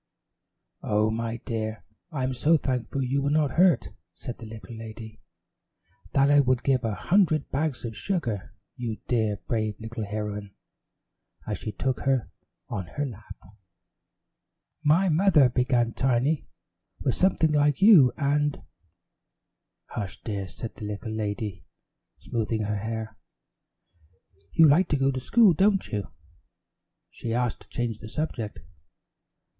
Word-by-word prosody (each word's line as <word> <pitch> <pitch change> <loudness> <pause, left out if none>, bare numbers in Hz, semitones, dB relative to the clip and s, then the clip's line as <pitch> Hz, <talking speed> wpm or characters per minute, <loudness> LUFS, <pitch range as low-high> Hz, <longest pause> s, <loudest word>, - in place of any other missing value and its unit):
"Oh, 105 +1 +1
my 115 +1 -2
dear, 110 -1 -3 0.3
I'm 130 -4 -1
so 150 +6 +3
thankful 130 0 -2
you 135 +2 0
were 140 - 0
not 150 -2 +2
hurt," 170 -5 +4 0.3
said 125 - -7
the 115 - -8
little 110 +1 -9
lady, 110 0 -9 0.9
"that 140 +1 +4
I 145 - +6
would 130 -3 +2
give 130 -2 +2
a 110 -2 -1
hundred 170 - +2
bags 140 -3 -1
of 115 -2 -5
sugar 120 - -3 0.2
you, 115 -3 -4
dear 110 -4 +1
brave 110 -3 -1
little 115 0 -5
heroine," 105 -1 -5 0.9
as - - -3
she 110 - -4
took 125 +6 -2
her 135 -3 0 0.4
on 95 -4 -4
her 145 - 0
lap. 110 -5 -9 1.4
"My 160 +5 +4
mother," 165 -5 +5
began 125 -2 +1
Tiny, 135 +4 +1 0.5
"was 130 - 0
something 180 -4 +3
like 145 -1 +3
you 190 - +8
and 145 0 +1 0.6
" - - -58
"Hush, 100 -2 -4
dear," 100 -3 -3
said 115 +4 -7
the 105 - -6
little 105 +2 -5
lady, 105 -1 -3 0.5
smoothing 110 -1 -2
her 105 0 -1
hair. 110 0 -5 1.3
"You 160 - +6
like 165 +6 +5
to 145 - +1
go 135 0 +2
to 130 - -3
school, 210 - +5
don't 195 +3 +3
you?" 105 -3 -3 1.0
she 115 -1 -4
asked 120 -1 -1
to - - -17
change 120 -3 -2
the 110 - -9
subject. 115 -6 -3
125 Hz, 140 wpm, -26 LUFS, 110-145 Hz, 1.4 s, you